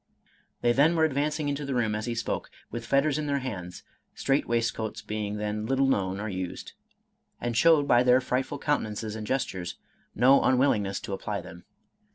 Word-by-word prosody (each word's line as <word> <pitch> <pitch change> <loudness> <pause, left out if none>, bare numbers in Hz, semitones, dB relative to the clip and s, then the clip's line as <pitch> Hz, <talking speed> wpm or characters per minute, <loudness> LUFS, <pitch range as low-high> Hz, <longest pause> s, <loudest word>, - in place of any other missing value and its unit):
They 120 - +3
then 145 +7 +4
were 160 -1 +4
advancing 150 +1 -1
into 145 +1 -2
the 135 -2 -3
room 115 -3 +1
as 110 +2 -3
he 120 - -2
spoke, 115 - -3 0.2
with 120 0 -6
fetters 140 +2 +2
in 150 - -3
their 140 -1 +1
hands 95 -10 -6 0.3
(strait 135 +1 +1
waistcoats 110 -2 -1
being 105 -1 -3
then 105 +1 -3
little 135 +1 +2
known 95 -7 0
or 110 - -3
used), 95 -3 -5 0.7
and 120 -1 -2
showed, 155 +2 +5
by 120 -2 +5
their 125 0 +5
frightful 130 +2 -2
countenances 110 -7 -2
and 110 -1 -6
gestures, 95 -9 -2 0.4
no 130 +5 +6
unwillingness 110 -7 +2
to 100 - -5
apply 95 - -3
them. - - -12
120 Hz, 180 wpm, -27 LUFS, 105-140 Hz, 0.7 s, no